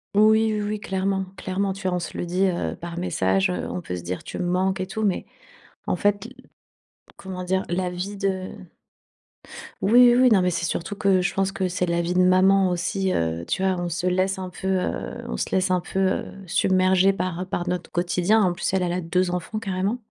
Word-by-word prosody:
Oui, 220 +1 +5
oui, 210 - -1
oui, 210 0 -2
clairement, 190 0 -1
clairement. 190 +1 -2
Tu 195 +1 -8
vois, 180 - 0
on - - 0
se 170 - -6
le - - -2
dit, 185 +3 +1
heu, 175 -2 -2
par 170 0 -8
message, 95 - +1
heu, 90 - -3
on 90 - -3
peut 90 - -5
se 90 - -5
dire: 90 +2 -5
«tu - - -7
manques 185 +2 0
et 185 - -3
tout». 220 +3 -4
Mais, 195 -3 0 0.6
en - - 0
fait 205 0 +1
l - - -10 0.8
comment 185 -1 -7
dire? 190 +1 0
La 180 +1 -1
vie 185 +3 -5
de 190 -1 -2 1.3
Oui, 240 +3 +6
oui, - - +3
oui, 250 - +7
non, 200 -4 +5
mais 180 - +2
c'est 170 0 -1
surtout 180 +4 -3
que, 190 -2 +3
je 180 - -1
pense 195 0 0
que 185 -1 -1
c'est 180 0 -1
la 170 0 0
vie 175 +1 -1
de 180 - +2
maman 185 +1 +5
aussi, 185 +2 -1
heu, 80 +1 -1
tu 190 - -1
vois? 190 -1 +1
On 175 - -2
se 170 +2 -2
laisse 185 +2 +1
un 185 -1 -5
peu, 190 +2 -7
heu, 190 -1 -2
on - - -3
se - - -2
laisse 185 0 +1
un 180 - +3
peu, 190 +2 -4
heu, 190 0 +1 0.2
submerger 190 0 +3
par 185 0 -3
par 175 -1 -3
notre 180 -1 -3
quotidien. 180 +5 +2
En 185 -3 +3
plus, 175 - -2
elle 190 -1 +2
elle 175 - -1
a 180 - -1
2 180 +1 0
enfants 180 +5 -4
carrément. 200 +3 -2
185 Hz, 230 wpm, -24 LUFS, 175-195 Hz, 1.3 s, oui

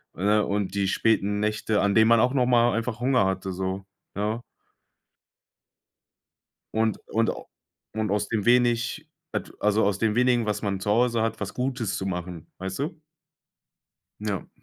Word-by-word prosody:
ne? 105 +3 +2
Und 100 -1 -1
die 100 -1 0
späten 105 -1 +1
Nächte, 105 0 0
an 100 -1 +2
denen 110 0 +5
man 115 -1 +5
auch 125 +3 +3
noch 125 -2 +2
mal 120 -1 +4
einfach 115 +1 -2
Hunger 125 -4 +3
hatte 95 0 -2
so, 95 +1 -3 0.3
ja. 105 +3 -1 2.3
Und 110 0 +1
und 115 0 +1
a - - -7 0.5
und 110 -2 -1
aus 105 0 0
dem 110 -3 -1
wenig, 120 -1 +2 0.2
et - - -3
also 105 +1 +3
aus 100 -1 +1
dem 110 -2 +1
wenigen, 125 -1 +3
was 105 0 -2
man 100 -2 -2
zu 105 - -2
Hause 115 0 +2
hat, 115 - -2
was 100 -1 -4
Gutes 125 -4 -2
zu 95 - -3
machen, 90 -3 -5
weißt 95 +5 -5
du? 155 +2 -4 1.2
Ja. 105 -4 -3
105 Hz, 165 wpm, -26 LUFS, 100-120 Hz, 2.3 s, denen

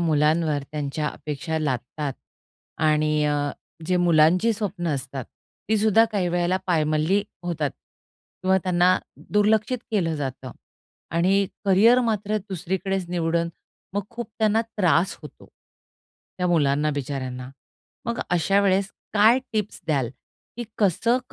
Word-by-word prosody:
मुलांवर 155 -2 +2
त्यांच्या 150 0 -2
अपेक्षा 150 +2 -4
लादतात 140 0 -2 0.7
आणि 155 -1 +2
अ, 145 -1 0 0.4
जे 180 - +2
मुलांची 175 +5 +4
स्वप्न 195 -5 -3
असतात, 135 -1 -5 0.4
ती 220 - +3
सुद्धा 220 +1 +5
काही 190 -4 +1
वेळेला 175 +1 +1
पायमल्ली 160 +3 +2 0.2
होतात 165 -5 -1 0.7
किंवा 190 0 +3
त्यांना 180 0 +4 0.3
दुर्लक्षित 215 +4 +2
केलं 175 -7 +1
जातं 130 -2 -5 0.6
आणि 190 +4 +2 0.2
करिअर 215 +6 +5
मात्र 215 -3 0
दुसरीकडेच 190 0 -2
निवडन, 170 -1 0 0.5
मग 205 - 0
खूप 240 -2 -6
त्यांना 220 0 +3 0.2
त्रास 180 -2 +2
होतो. - - -12 0.9
त्या 180 - +1
मुलांना 150 -3 +2
बिचाऱ्यांना. 130 -2 -4 0.6
मग 235 0 -2
अशा 180 +3 +3
वेळेस 195 0 +2 0.2
काय 220 +4 +6
टिप्स 210 -2 -2
द्याल? 135 -6 0 0.5
की 240 - -4
कसं 225 +5 +2
175 Hz, 120 wpm, -24 LUFS, 150-200 Hz, 0.9 s, काय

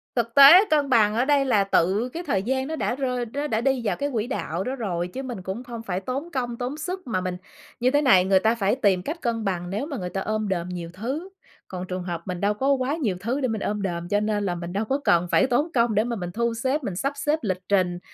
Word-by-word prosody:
thực 235 -2 -1
tế 295 +9 +10
cân 295 -3 +2
bằng 215 -5 +4
ở 240 +3 +2
đây 280 -1 +3
là 215 -6 +3
tự 195 +5 +1
cái 340 +2 -4
thời 195 - 0
gian 265 +3 -1
nó 320 - -3
đã 250 - -1
rơi 250 -3 -2
nó 290 +1 -2
đã 220 -2 0
đi 265 -1 +1
vào 195 -4 +1
cái 285 0 -2
quỹ 225 0 -1
đạo 185 -9 -3
đó 255 +5 -3
rồi, 180 -8 -2
chứ 265 +9 -6
mình 245 -7 -6
cũng 190 +6 -5
không 235 -2 -8
phải 185 -3 -2
tốn 270 - -5
công 245 -4 -3
tốn 255 +4 -4
sức 360 +1 -5
mà 200 -6 -1
mình 180 -1 -3 0.4
như 250 +1 +2
thế 290 +1 +3
này. 190 -11 +5
Người 190 0 +4
ta 220 +4 +2
phải 205 -1 +1
tìm 200 -8 +2
cách 325 - -5
cân 230 -2 -1
bằng 175 -2 -2
nếu 210 +9 -2
mà 285 -4 -5
người 180 -3 -4
ta 195 - -3
ôm 215 0 -2
đồm 175 -1 -2
nhiều 175 -2 -5
thứ, 270 - -4 0.4
còn 185 -1 -6
trường 185 0 -4
hợp 175 -2 -4
mình 180 -1 -4
đâu 205 +1 +2
có 270 +6 0
quá 265 +3 0
nhiều 230 - -1
thứ 245 +7 -2
để 255 - +1
mình 220 -3 -3
ôm 210 0 -2
đồm, 175 -3 -3
cho 205 - +2
nên 210 -1 -1
là 175 - -1
mình 175 +1 -6
đâu 210 +3 -1
có 270 +5 0
cần 175 -6 +3
phải 265 - +4
tốn 290 +7 +1
công 235 -3 +2
để 215 - +3
mà 240 0 -3
mình 175 -4 -5
thu 235 +4 -1
xếp, 260 +5 -1
mình 190 -6 -3
sắp 275 +8 -1
xếp 295 +3 0
lịch 185 -4 -1
trình, 180 -3 +1
225 Hz, 280 wpm, -24 LUFS, 190-265 Hz, 0.4 s, tế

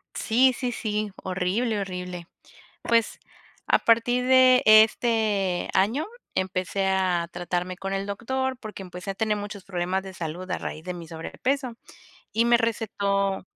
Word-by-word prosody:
Sí, 255 +3 +3
sí, 250 -2 -2
sí, 215 -2 -2
horrible, 195 +5 -1
horrible. 180 -2 -6 0.6
Pues, 230 -1 +1 0.5
a - - +4
partir 245 +2 +2
de 255 0 +6
este 215 -3 +4
año, 225 +11 +2 0.3
empecé 185 +1 -1
a 185 -3 +1
tratarme 175 +1 -3
con 195 +1 -5
el 195 0 -2
doctor, 260 +6 -2
porque 215 -4 -8
empecé 180 +1 -7
a - - -3
tener 215 +1 0
muchos 205 -1 -7
problemas 185 0 -2
de 190 -1 -9
salud 175 +2 -6
a - - -1
raíz 155 - -6
de 180 0 -4
mi 170 -1 -8
sobrepeso, 250 - -3 0.6
y 225 +2 +2
me 240 0 +5
recetó 200 -4 -1
200 Hz, 145 wpm, -25 LUFS, 185-230 Hz, 0.6 s, de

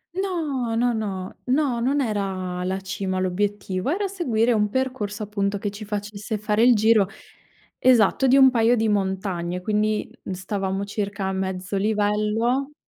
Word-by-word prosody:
No. 305 -12 -2
No, 240 +1 +2
no. 195 -4 -4
No, 260 -2 +1
non 270 +4 +1
era 190 -6 -2
la 190 +1 -1
cima 190 0 -3
l'obiettivo, 190 +2 -1
era 395 +5 0
seguire 245 - +1
un 210 -1 +1
percorso 220 -4 -2
appunto 200 -1 -1
che 205 +1 -3
ci 210 +1 -8
facesse 210 +1 -4
fare 210 +1 +1
il 245 0 +7
giro, 215 -2 +4 0.7
esatto, 255 +1 +4
di 265 +2 +5
un 265 -1 +8
paio 235 0 +3
di 225 -1 +1
montagne, 190 -3 -1
quindi, 215 +2 0
mhmm, 190 - -4
stavamo 195 +1 -3
circa 200 -1 -3
a 190 - 0
mezzo 190 0 -3
livello. 215 +6 0
210 Hz, 155 wpm, -23 LUFS, 195-240 Hz, 0.7 s, un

